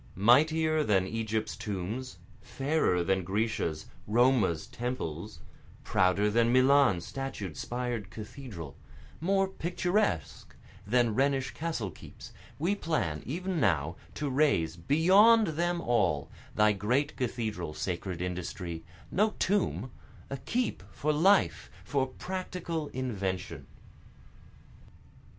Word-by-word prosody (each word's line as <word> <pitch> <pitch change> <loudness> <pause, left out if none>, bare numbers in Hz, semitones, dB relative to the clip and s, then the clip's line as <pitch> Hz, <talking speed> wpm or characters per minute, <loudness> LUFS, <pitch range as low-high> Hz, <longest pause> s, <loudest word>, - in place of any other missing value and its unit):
Mightier 155 - +4
than 95 -8 +2
Egypt's 110 +1 -2
tombs, 105 +2 -4 0.2
Fairer 135 - 0
than 95 +1 +1
Grecia's, 95 -5 -1 0.2
Roma's 110 -7 +3
temples, 110 - -5 0.4
Prouder 95 +3 +2
than 115 +2 +3
Milan's 130 -8 +4
statued, 135 - -5
spired 120 -5 -3
cathedral, 105 - -8 0.4
More 195 +3 +2
picturesque 180 - -1 0.3
than 120 0 +3
Rhenish 135 +1 +1
castle 155 - -3
keeps, - - -12 0.2
We 170 +7 +1
plan 100 - -1
even 180 +5 -2
now 80 - +1 0.2
to 150 - -2
raise, 130 - +2
beyond 190 - +5
them 175 +2 0
all, 90 - +1 0.2
Thy 105 0 +5
great 125 +9 0
cathedral 110 - -3
sacred 90 -1 -3
industry, 90 -2 -5 0.3
no 210 +3 +2
tomb, 155 - 0 0.4
A 140 - -2
keep 240 - -2
for 150 +1 -1
life 190 +7 +3
for 135 -3 0
practical 175 0 -4
invention. 100 -9 -4
120 Hz, 105 wpm, -30 LUFS, 95-155 Hz, 0.4 s, beyond